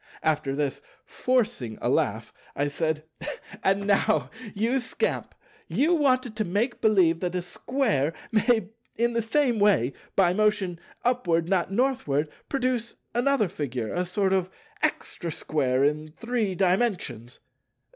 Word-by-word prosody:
After 145 -3 +1
this, 145 -2 -1 0.2
forcing 225 - 0
a - - -2
laugh, - - 0 0.2
I 145 +1 0
said, 155 +1 -1 0.6
"And 195 +1 +2
now, 205 +2 +2 0.2
you 230 +6 +1
scamp, 250 - -2 0.3
you 315 +6 +2
wanted 255 -7 +2
to 215 - +1
make 210 +7 -1
believe 185 -7 +4
that 180 0 -2
a 180 - 0
Square 180 - 0 0.2
may 220 -2 +2 0.3
in 235 +1 +2
the 230 - +1
same 240 0 +1
way 190 - +3 0.2
by 180 -2 +4
motion 205 -4 +1 0.3
'Upward, 175 -10 +2
not 185 -1 +1
Northward' 195 - +1 0.2
produce 255 -3 -1 0.2
another 245 -2 +2
figure, 130 - -4
a 180 - 0
sort 190 +2 0
of 185 -1 +1 0.3
extra 170 - -1
square 135 -4 0
in 150 +1 0
Three 230 -5 -1
Dimensions. 180 - 0
195 Hz, 135 wpm, -26 LUFS, 160-235 Hz, 0.6 s, believe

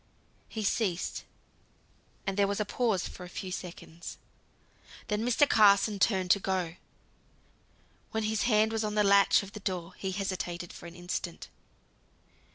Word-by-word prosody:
He 220 - -4
ceased, 195 -4 -1 1.0
and 195 - -1
there 200 0 +3
was 200 +1 -1
a 210 - +1
pause 215 -3 0
of - - -11
a 180 0 -8
few 185 +1 -6
seconds. 170 -2 -7 0.9
Then 210 0 0
Mr. 245 +4 +4
Carson 200 -2 +5
turned 190 -3 +2
to 200 - +5
go. 185 -3 -2 1.3
When 220 0 -2
his 215 0 0
hand 215 0 +4
was 225 0 -1
on 210 0 -2
the 210 - +4
latch 200 0 +5
of 195 - -10
the 210 - -8
door, 180 -2 -3
he 190 - -3
hesitated 180 -3 -3
for - - -10
an 170 - -11
instant. 175 -1 -5
200 Hz, 155 wpm, -30 LUFS, 180-215 Hz, 1.3 s, Carson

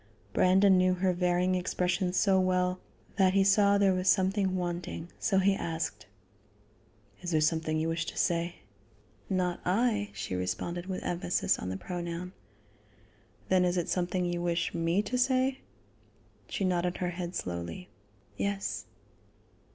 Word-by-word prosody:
Brandon 190 +1 +5
knew 185 0 +3
her 185 0 +1
varying 180 +1 +1
expressions 180 0 0
so 190 -1 +4
well 185 0 +1 0.4
that 190 -1 +4
he 195 - +5
saw 200 +1 +4
there 200 -1 +4
was 185 +1 +1
something 190 0 +2
wanting, 175 -1 -4
so 195 - +1
he 195 +1 +4
asked: 160 - -4 1.1
"Is 175 - -4
there 160 -3 +2
something 155 0 +1
you 160 +1 0
wish 165 0 -1
to - - -6
say?" 170 0 0 0.7
"Not 180 -2 0
I," 210 +2 +1
she - - -5
responded 95 - -3
with 185 -1 -4
emphasis 175 0 0
on 90 - -4
the 95 - -3
pronoun. 175 - -5 1.2
"Then 185 -1 +4
is 180 0 +1
it 175 - -1
something 180 0 0
you 175 0 -2
wish 170 0 -1
me 170 +4 +1
to 250 +4 -2
say?" 260 +1 +2 0.9
She 195 - -2
nodded 180 -1 0
her 180 -1 -2
head 175 0 -5
slowly: 85 0 -5 0.5
"Yes." 200 0 -2
180 Hz, 145 wpm, -30 LUFS, 170-190 Hz, 1.2 s, Brandon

